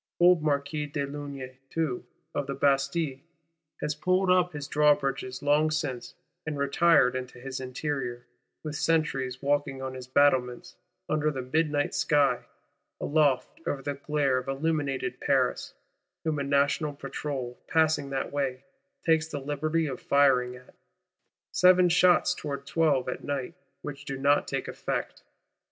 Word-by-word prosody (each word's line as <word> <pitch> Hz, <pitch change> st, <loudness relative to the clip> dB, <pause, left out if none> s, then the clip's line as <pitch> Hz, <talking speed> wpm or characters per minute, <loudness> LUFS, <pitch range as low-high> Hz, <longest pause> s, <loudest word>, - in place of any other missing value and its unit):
Old 175 Hz, -1 st, +6 dB
Marquis 150 Hz, 0 st, -1 dB
de 145 Hz, -1 st, -2 dB
Launay 140 Hz, -2 st, -7 dB
too, 155 Hz, -7 st, -2 dB, 0.3 s
of 140 Hz, -, -2 dB
the 140 Hz, -, -3 dB
Bastille, 140 Hz, +1 st, +1 dB, 0.6 s
has 150 Hz, -, 0 dB
pulled 185 Hz, +4 st, +1 dB
up 180 Hz, -1 st, +3 dB
his 145 Hz, -3 st, -6 dB
drawbridges 140 Hz, -3 st, +1 dB
long 150 Hz, +2 st, +3 dB
since, 145 Hz, -5 st, -3 dB, 0.3 s
"and 150 Hz, -2 st, -4 dB
retired 140 Hz, -2 st, +4 dB
into 125 Hz, -1 st, -6 dB
his 130 Hz, +1 st, -5 dB
interior;" 130 Hz, -2 st, -4 dB, 0.4 s
with 155 Hz, -1 st, -5 dB
sentries 140 Hz, -6 st, 0 dB
walking 145 Hz, -1 st, 0 dB
on 130 Hz, 0 st, -5 dB
his 130 Hz, -1 st, -8 dB
battlements, 130 Hz, +4 st, +2 dB, 0.3 s
under 155 Hz, 0 st, +1 dB
the 135 Hz, -4 st, -4 dB
midnight 150 Hz, +2 st, 0 dB
sky, 140 Hz, -4 st, +2 dB, 0.5 s
aloft 145 Hz, -, +1 dB
over 135 Hz, -1 st, -2 dB
the 145 Hz, -, -2 dB
glare 140 Hz, -2 st, 0 dB
of 130 Hz, -, -9 dB
illuminated 140 Hz, -1 st, -1 dB
Paris;—whom 155 Hz, -2 st, -2 dB
a -, -, -1 dB
National 140 Hz, +2 st, +1 dB
Patrol, 135 Hz, -3 st, -5 dB
passing 160 Hz, -3 st, +2 dB
that 135 Hz, -1 st, -3 dB
way, 135 Hz, -2 st, -2 dB, 0.4 s
takes 160 Hz, -1 st, +3 dB
the 145 Hz, -, -5 dB
liberty 155 Hz, +3 st, -1 dB
of 135 Hz, -4 st, -5 dB
firing 125 Hz, -3 st, +3 dB
at; 125 Hz, 0 st, -16 dB, 0.8 s
"seven 180 Hz, 0 st, +5 dB
shots 180 Hz, +1 st, +4 dB
towards 140 Hz, -5 st, -5 dB
twelve 150 Hz, -6 st, +2 dB
at 125 Hz, -, -4 dB
night," 140 Hz, +2 st, -3 dB, 0.3 s
which 145 Hz, -1 st, -7 dB
do 135 Hz, -, -4 dB
not 140 Hz, +2 st, +3 dB
take -, -, -3 dB
effect. -, -, -4 dB
145 Hz, 140 wpm, -28 LUFS, 135-155 Hz, 0.8 s, Old